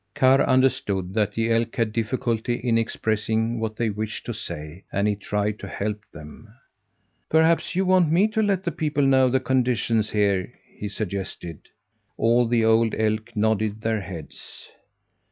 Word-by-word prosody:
Karr 135 Hz, +1 st, +5 dB
understood 100 Hz, -9 st, +1 dB
that 105 Hz, -1 st, 0 dB
the 115 Hz, +1 st, 0 dB
elk 115 Hz, 0 st, 0 dB
had 115 Hz, -2 st, 0 dB
difficulty 120 Hz, 0 st, -1 dB
in 120 Hz, -1 st, 0 dB
expressing 110 Hz, 0 st, 0 dB
what 110 Hz, -1 st, -3 dB
they 115 Hz, -1 st, 0 dB
wished 105 Hz, +1 st, -5 dB
to -, -, -4 dB
say, 75 Hz, +5 st, -7 dB
and 100 Hz, +1 st, +1 dB
he 105 Hz, -, +1 dB
tried 105 Hz, +1 st, -2 dB
to 100 Hz, -, -7 dB
help 105 Hz, +2 st, -3 dB
them. 75 Hz, +8 st, -12 dB, 0.8 s
"Perhaps 160 Hz, +2 st, +2 dB
you 190 Hz, +1 st, +1 dB
want 185 Hz, -4 st, +4 dB
me 185 Hz, +6 st, +4 dB
to 220 Hz, 0 st, 0 dB
let 200 Hz, -3 st, +1 dB
the 170 Hz, -, -1 dB
people 150 Hz, -2 st, -1 dB
know 130 Hz, -1 st, +4 dB
the 130 Hz, +1 st, +2 dB
conditions 120 Hz, -4 st, +1 dB
here?" 100 Hz, -3 st, +1 dB, 0.2 s
he 105 Hz, -, -5 dB
suggested. 95 Hz, -5 st, -5 dB, 0.6 s
All 120 Hz, +1 st, +3 dB
the 115 Hz, -1 st, +2 dB
old 110 Hz, 0 st, +3 dB
elk 110 Hz, +1 st, -1 dB
nodded 110 Hz, 0 st, 0 dB
their 110 Hz, -2 st, -1 dB
heads. 85 Hz, -6 st, -9 dB
110 Hz, 160 wpm, -24 LUFS, 105-130 Hz, 0.8 s, Karr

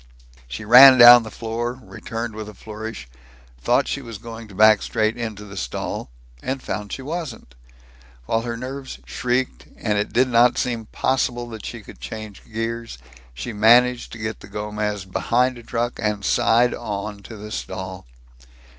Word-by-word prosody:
She 65 Hz, -, -7 dB
ran 130 Hz, +4 st, +10 dB
down 120 Hz, 0 st, +10 dB
the 110 Hz, -, -8 dB
floor, 115 Hz, +2 st, -4 dB
returned 115 Hz, -3 st, -6 dB
with 110 Hz, 0 st, -7 dB
a 105 Hz, -, -12 dB
flourish, 110 Hz, -, -8 dB, 0.5 s
thought -, -, +2 dB
she 140 Hz, -, -3 dB
was 115 Hz, -4 st, -8 dB
going 115 Hz, 0 st, -9 dB
to 100 Hz, -, -14 dB
back 110 Hz, 0 st, +6 dB
straight 110 Hz, +1 st, 0 dB
into 110 Hz, -3 st, -5 dB
the 100 Hz, -1 st, -11 dB
stall 90 Hz, -, -4 dB, 0.3 s
and 135 Hz, +1 st, -3 dB
found 105 Hz, -5 st, -5 dB
she 135 Hz, -, -5 dB
wasn't. 145 Hz, -, -6 dB, 0.7 s
While 115 Hz, -, 0 dB
her 115 Hz, 0 st, -4 dB
nerves 130 Hz, +2 st, -7 dB
shrieked, 125 Hz, +1 st, -2 dB
and 105 Hz, -2 st, 0 dB
it 105 Hz, -, -2 dB
did 130 Hz, +2 st, +3 dB
not 120 Hz, 0 st, +4 dB
seem 115 Hz, -3 st, -2 dB
possible 120 Hz, -2 st, -1 dB
that 110 Hz, -2 st, -8 dB
she 115 Hz, -, -7 dB
could -, -, -14 dB
change 110 Hz, -2 st, -8 dB
gears, 115 Hz, -, -4 dB, 0.4 s
she 115 Hz, -, -5 dB
managed 120 Hz, +4 st, +4 dB
to -, -, -7 dB
get 110 Hz, 0 st, -4 dB
the -, -, -12 dB
Gomez 105 Hz, -1 st, -3 dB
behind 125 Hz, +6 st, 0 dB
a -, -, -11 dB
truck 120 Hz, +1 st, -3 dB
and 105 Hz, -2 st, -1 dB
side 120 Hz, 0 st, +3 dB
on 105 Hz, -2 st, -5 dB
to 110 Hz, +2 st, -10 dB
the 105 Hz, +1 st, -9 dB
stall. 95 Hz, -, -6 dB
115 Hz, 170 wpm, -22 LUFS, 105-120 Hz, 0.7 s, ran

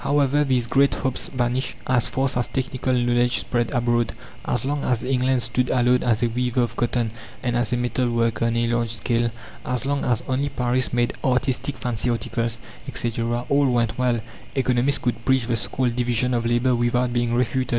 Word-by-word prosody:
However, 145 Hz, 0 st, +2 dB
these 130 Hz, -4 st, +1 dB
great 135 Hz, +4 st, +3 dB
hopes 130 Hz, -, -2 dB
vanished 125 Hz, 0 st, -1 dB
as 125 Hz, -2 st, +2 dB
fast 135 Hz, 0 st, 0 dB
as 120 Hz, -1 st, +1 dB
technical 130 Hz, 0 st, -2 dB
knowledge 120 Hz, -1 st, +2 dB
spread 120 Hz, -2 st, -1 dB
abroad. 120 Hz, -3 st, +1 dB, 0.3 s
As -, -, -1 dB
long 145 Hz, +1 st, -1 dB
as 125 Hz, -1 st, 0 dB
England 130 Hz, -1 st, +1 dB
stood 125 Hz, +3 st, 0 dB
alone 125 Hz, 0 st, +3 dB
as 115 Hz, -1 st, +1 dB
a -, -, +4 dB
weaver 125 Hz, +1 st, 0 dB
of 120 Hz, 0 st, -3 dB
cotton 120 Hz, -2 st, 0 dB, 0.3 s
and 120 Hz, -2 st, 0 dB
as 120 Hz, -1 st, +1 dB
a 125 Hz, -, +1 dB
metal 125 Hz, 0 st, 0 dB
worker 115 Hz, -1 st, +1 dB
on 115 Hz, 0 st, +1 dB
a 120 Hz, -, +2 dB
large 120 Hz, 0 st, 0 dB
scale; 115 Hz, +1 st, 0 dB, 0.3 s
as 125 Hz, 0 st, -2 dB
long 140 Hz, 0 st, 0 dB
as 120 Hz, -3 st, 0 dB
only 135 Hz, +2 st, 0 dB
Paris 125 Hz, -1 st, 0 dB
made 120 Hz, 0 st, +1 dB
artistic 130 Hz, +1 st, 0 dB
fancy 120 Hz, -1 st, -1 dB
articles, 115 Hz, -1 st, -1 dB, 0.3 s
etc., 120 Hz, +1 st, -2 dB
all 140 Hz, 0 st, +3 dB
went 120 Hz, -3 st, +1 dB
well, 125 Hz, -2 st, +2 dB, 0.4 s
economists 130 Hz, +1 st, +2 dB
could 120 Hz, -1 st, -2 dB
preach 130 Hz, -2 st, +2 dB
the 120 Hz, 0 st, 0 dB
so 115 Hz, -, -2 dB
called 125 Hz, -3 st, 0 dB
division 125 Hz, 0 st, +1 dB
of 115 Hz, -1 st, 0 dB
labour 120 Hz, +2 st, +2 dB
without 120 Hz, +1 st, +1 dB
being 120 Hz, -1 st, +1 dB
refuted. 125 Hz, +1 st, 0 dB
120 Hz, 190 wpm, -23 LUFS, 120-130 Hz, 0.4 s, a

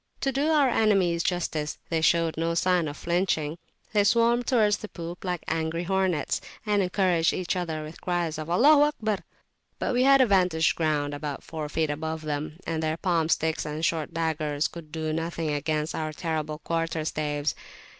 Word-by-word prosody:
To 270 Hz, -, +1 dB
do 275 Hz, +3 st, 0 dB
our 300 Hz, -3 st, +4 dB
enemies 195 Hz, -8 st, +2 dB
justice, 165 Hz, -4 st, -2 dB
they 165 Hz, -1 st, 0 dB
showed 165 Hz, 0 st, +3 dB
no 165 Hz, +1 st, 0 dB
[p.193] -, -, 0 dB
sign 180 Hz, -2 st, +2 dB
of 145 Hz, -, -6 dB
flinching; 170 Hz, -3 st, 0 dB, 0.4 s
they 205 Hz, -1 st, +4 dB
swarmed 235 Hz, +2 st, +3 dB
towards 215 Hz, -5 st, +3 dB
the 210 Hz, -, -7 dB
poop 170 Hz, 0 st, -7 dB
like 180 Hz, -3 st, -2 dB
angry 160 Hz, +1 st, -1 dB
hornets, 185 Hz, -4 st, 0 dB, 0.2 s
and 205 Hz, -1 st, +2 dB
encouraged 180 Hz, -3 st, +2 dB
each 185 Hz, 0 st, -2 dB
other 160 Hz, -4 st, -3 dB
with 155 Hz, +2 st, -10 dB
cries 175 Hz, -3 st, -1 dB
of 155 Hz, -, -5 dB
"Allaho 290 Hz, -, +6 dB
akbar!" 215 Hz, -9 st, -2 dB, 0.6 s
But -, -, -1 dB
we 245 Hz, -, +2 dB
had 275 Hz, +1 st, +6 dB
a 260 Hz, -, +6 dB
vantage 180 Hz, -6 st, +3 dB
ground 150 Hz, -3 st, 0 dB
about 145 Hz, -1 st, -5 dB
four 155 Hz, -2 st, -5 dB
feet 155 Hz, -1 st, 0 dB
above 160 Hz, +1 st, -4 dB
them, 150 Hz, +1 st, -3 dB
and 160 Hz, -1 st, -2 dB
their 155 Hz, 0 st, -1 dB
palm 170 Hz, -3 st, +1 dB
sticks 160 Hz, 0 st, +1 dB
and 150 Hz, +2 st, -2 dB
short 160 Hz, -3 st, -1 dB
daggers 155 Hz, -2 st, -1 dB
could 165 Hz, -3 st, -11 dB
do 155 Hz, -1 st, -2 dB
nothing 165 Hz, -1 st, -2 dB
against 150 Hz, +1 st, -1 dB
our 155 Hz, -1 st, -3 dB
terrible 155 Hz, -2 st, -3 dB
quarterstaves. 155 Hz, -3 st, -1 dB
165 Hz, 180 wpm, -26 LUFS, 155-185 Hz, 0.6 s, Allaho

